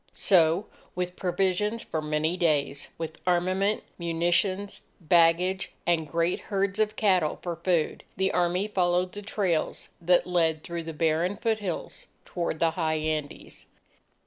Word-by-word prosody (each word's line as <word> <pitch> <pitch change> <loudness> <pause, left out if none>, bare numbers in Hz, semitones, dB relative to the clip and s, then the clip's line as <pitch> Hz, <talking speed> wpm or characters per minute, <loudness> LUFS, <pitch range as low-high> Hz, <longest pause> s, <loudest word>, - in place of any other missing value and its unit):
So 175 +1 +3 0.3
with 180 0 -3
provisions 195 +4 0
for 160 - -3
many 155 +2 0
days, 150 -5 0
with 160 -1 -6
armament, 185 +4 +1 0.2
munitions, 175 +4 0 0.2
baggage, 175 +3 +3
and 160 -3 +1
great 170 +1 0
herds 200 0 0
of 215 0 +1
cattle 185 -8 +2
for 175 -1 -3
food, 170 -2 0
the 190 0 +1
Army 180 +3 +1
followed 180 -2 +1
the 205 - -7
trails 195 -5 -1
that 175 +1 +3
led 165 -3 +1
through 170 -1 -5
the 165 - -5
barren 165 +5 +1
foothills 215 -6 -3 0.2
toward 170 -3 -3
the 165 -1 +3
high 160 -2 -1
Andes. 155 -1 -4
175 Hz, 135 wpm, -27 LUFS, 165-190 Hz, 0.3 s, So